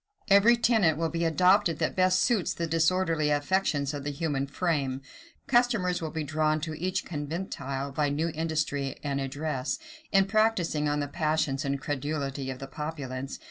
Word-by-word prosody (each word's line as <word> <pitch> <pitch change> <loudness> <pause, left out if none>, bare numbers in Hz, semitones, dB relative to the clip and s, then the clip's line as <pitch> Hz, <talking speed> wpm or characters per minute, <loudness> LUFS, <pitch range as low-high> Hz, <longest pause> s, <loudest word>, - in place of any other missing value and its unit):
Every 215 +5 +7
tenet 220 -10 +3
will 165 0 -1
be 170 0 -1
adopted 180 +1 +3
that - - -1
best 185 0 +3
suits 230 -8 +1
the 170 - -2
disorderly 165 -1 +1
affections 145 -1 +1
of 145 -1 -5
the 145 - -2
human 145 -2 -2
frame. 140 -4 -1 0.4
Customers 230 -9 +2
will 160 - -3
be 160 0 -3
drawn 155 +1 +1
to 155 0 -4
each 185 +1 -1
conventicle 145 -4 -4
by 145 +1 +1
new 155 +4 0
industry 150 -4 -2
and 140 -1 -1
address, 135 0 -2 0.3
in 195 -1 +5
practising 195 -8 +1
on 145 0 0
the 145 - -2
passions 155 -2 0
and 140 -1 -1
credulity 140 -1 -3
of 130 - -4
the 135 - -7
populace. 135 -3 -5
155 Hz, 165 wpm, -28 LUFS, 140-180 Hz, 0.4 s, Every